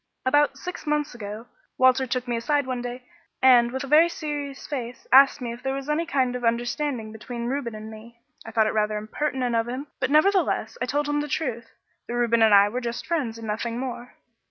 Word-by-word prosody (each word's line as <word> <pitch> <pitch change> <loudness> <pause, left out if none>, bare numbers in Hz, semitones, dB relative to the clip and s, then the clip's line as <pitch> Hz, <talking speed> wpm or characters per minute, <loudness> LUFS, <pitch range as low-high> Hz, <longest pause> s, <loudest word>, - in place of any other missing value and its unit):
"About 285 +1 +3
six 360 +2 -7
months 295 -1 0
ago, 215 0 -7 0.3
Walter 260 0 +4
took 250 +1 -2
me 240 - -1
aside 285 +5 0
one 255 -1 -3
day 245 +1 -6 0.3
and, 245 -2 +6
with 265 +2 -3
a - - -6
very 310 +4 +6
serious 290 -4 -5
face, 250 -4 -6
asked 275 +1 +7
me 235 -1 -3
if 240 - -11
there 265 +1 -2
was 275 0 -6
any 310 +3 0
kind 255 -3 +1
of 250 - -5
understanding 240 0 -1
between 235 +2 -6
Reuben 245 -3 -3
and 215 +1 -8
me. 230 +2 -13 0.2
I - - -9
thought 220 -1 +2
it 215 - 0
rather 215 0 0
impertinent 250 +3 -2
of 230 0 +1
him, 255 +4 -4
but 255 - 0
nevertheless, 370 +10 +2
I - - 0
told 290 +1 0
him 290 0 0
the 295 - -4
truth, 245 -6 -3 0.4
that 240 - -4
Reuben 235 -1 +2
and 220 -1 +6
I 200 0 +7
were 245 +5 -3
just 235 0 -4
friends 275 -10 -2
and 225 - -8
nothing 225 +2 -3
more. 250 -1 -6
250 Hz, 220 wpm, -25 LUFS, 230-285 Hz, 0.4 s, asked